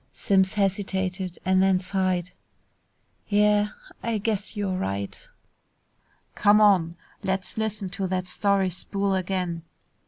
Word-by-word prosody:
Simms 190 -2 +2
hesitated 190 -2 -1
and 185 0 +3
then 190 -1 +4
sighed, 185 -1 -1 1.0
"Yeah, 210 0 +3 0.3
I 230 -1 -1
guess 210 0 -2
you're 195 -2 -1
right." 100 - -4 1.1
"Come 210 0 +4
on. 185 -6 +4 0.3
Let's 190 -1 -2
listen 215 -3 -2
to 190 +1 -3
that 185 0 -1
story 195 0 +1
spool 195 +3 -1
again." 180 -2 -2
190 Hz, 115 wpm, -25 LUFS, 185-205 Hz, 1.1 s, then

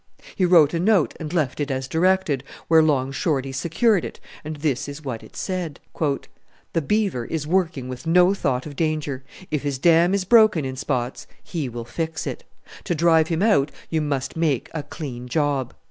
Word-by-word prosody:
He 185 - +2
wrote 170 -4 +6
a 165 - 0
note 190 -2 +3
and 155 -2 -5
left 155 -7 0
it 145 0 -1
as 130 -1 -2
directed, 165 -4 +1 0.2
where 160 -1 +6
Long 135 -4 +1
Shorty 135 -3 -1
secured 170 - +1
it, - - -7 0.2
and 155 +1 -5
this 145 -3 -1
is 145 +2 -8
what 120 -4 -4
it - - -15
said, 180 -6 -3 0.9
"The 165 - +1
Beaver 190 - 0
is 155 +1 -3
working 160 -6 0
with 130 +5 -7
no 180 +3 +5
thought 130 -9 -1
of 145 -2 -8
danger. 150 -4 -2 0.3
If 150 -2 0
his 145 -2 -2
dam 170 +5 +4
is 195 -2 -1
broken 215 - +5
in 130 0 -4
spots 130 -2 -3 0.2
he 155 -7 -4
will 120 -1 -6
fix 160 +5 -4
it. - - -5 0.4
To 175 - 0
drive 160 0 +4
him 165 +3 0
out 145 -10 +3 0.2
you 160 -1 +1
must 140 -3 -2
make 155 -7 0
a 160 - -2
clean 125 -5 -7
job. 140 -2 0
155 Hz, 190 wpm, -23 LUFS, 135-170 Hz, 0.9 s, wrote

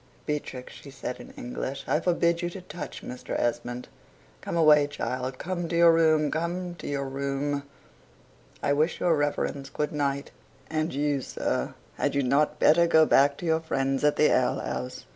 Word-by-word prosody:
Beatrix," 145 -4 -4
she 140 - -12
said 130 -2 -6
in - - -10
English, 245 - -5
"I 150 - +2
forbid 170 0 +1
you 175 - -1
to 185 +2 -8
touch 175 -3 -8
Mr. 125 - -5
Esmond. 120 +1 -2 0.5
Come - - -3
away, 150 -3 +6
child 130 -2 -4
come 175 +1 -3
to 170 - -2
your 170 0 +7
room. 155 -2 +3
Come 175 +2 -2
to - - -7
your 140 -1 -2
room 140 +1 -2 1.0
I 145 - +3
wish 155 +4 +1
your 175 -2 +3
Reverence 145 -1 -1
good 150 +1 -2
night 140 -1 -1 0.4
and 155 +1 0
you, 145 0 0
sir, 65 - -2 0.2
had - - 0
you 140 - +2
not 145 +4 +2
better 170 +3 +5
go 160 -1 +6
back 140 0 +4
to - - -7
your 160 -1 +2
friends 135 -3 -1
at 150 0 +4
the 150 - +4
ale - - +1
house?" 65 - -5
150 Hz, 180 wpm, -27 LUFS, 135-165 Hz, 1.0 s, your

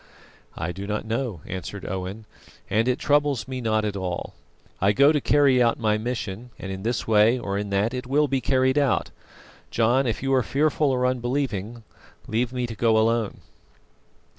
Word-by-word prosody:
"I 85 - -2
do 95 +3 -7
not 105 +1 -2
know," 115 - -3
answered 95 +2 -6
Owen, 95 +4 -5 0.5
"and 110 +4 +2
it 125 0 +2
troubles 145 -5 +1
me 130 -1 -4
not 110 -2 +1
at 105 -1 -2
all. 90 -2 -4 0.5
I 100 +2 +4
go 140 +7 +6
to 150 -2 +1
carry 140 -3 +4
out 115 -1 +3
my 110 -2 +1
mission, 115 -1 -4
and 95 - -6
in 95 0 -5
this 115 +3 -2
way 110 +2 +4
or 100 -5 -3
in 100 0 -2
that 100 +4 0
it 125 0 -4
will 145 +3 +2
be 135 -1 0
carried 130 +2 +2
out. 140 -5 +1 0.6
John, 120 +4 +2
if 115 +2 -2
you 135 0 +1
are 130 - +4
fearful 150 +3 +1
or 125 -1 +1
unbelieving 120 -3 -2 0.4
leave 120 +2 -1
me 125 -1 -2
to 115 - -6
go 110 0 +3
alone." 115 -1 +1
115 Hz, 185 wpm, -24 LUFS, 105-130 Hz, 0.6 s, go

